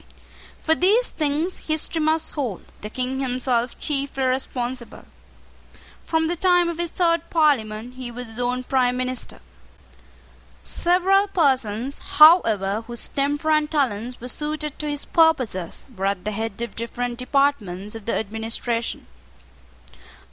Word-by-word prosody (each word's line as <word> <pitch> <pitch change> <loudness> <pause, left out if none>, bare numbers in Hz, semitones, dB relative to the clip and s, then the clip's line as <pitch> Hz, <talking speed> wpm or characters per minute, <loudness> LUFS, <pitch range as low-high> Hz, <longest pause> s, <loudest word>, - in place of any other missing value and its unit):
For 320 - +5
these 410 +9 +3
things 310 +4 -2
history 315 +1 0
must 315 +1 +1
hold 250 - -3 0.2
the 210 - -6
King 255 +3 -3
himself 250 -2 -1
chiefly 275 -2 -2
responsible. 255 -1 -3 1.0
From 320 0 +1
the 345 - -1
time 355 0 +3
of 340 -1 -5
his 345 -1 -1
third 335 -2 +1
Parliament 245 -7 +1
he 255 -2 -6
was 245 +1 -7
his 225 +2 -9
own 250 +1 -1
prime 250 -1 +1
minister. 255 0 -3 1.2
Several 375 +3 +2
persons, 265 - 0
however, 225 - +5
whose 240 -1 -4
temper 290 +3 0
and 305 -1 +2
talents 250 -5 -1
were 245 - -7
suited 300 +2 -3
to 300 - -2
his 290 -1 -3
purposes, 255 - +1
were 195 0 -1
at 200 -1 -2
the 215 - -1
head 220 0 -4
of 235 - -6
different 240 +1 -4
departments 250 -8 0
of 225 -2 -9
the 230 - -1
administration. 225 +2 -3
260 Hz, 135 wpm, -23 LUFS, 230-310 Hz, 1.2 s, For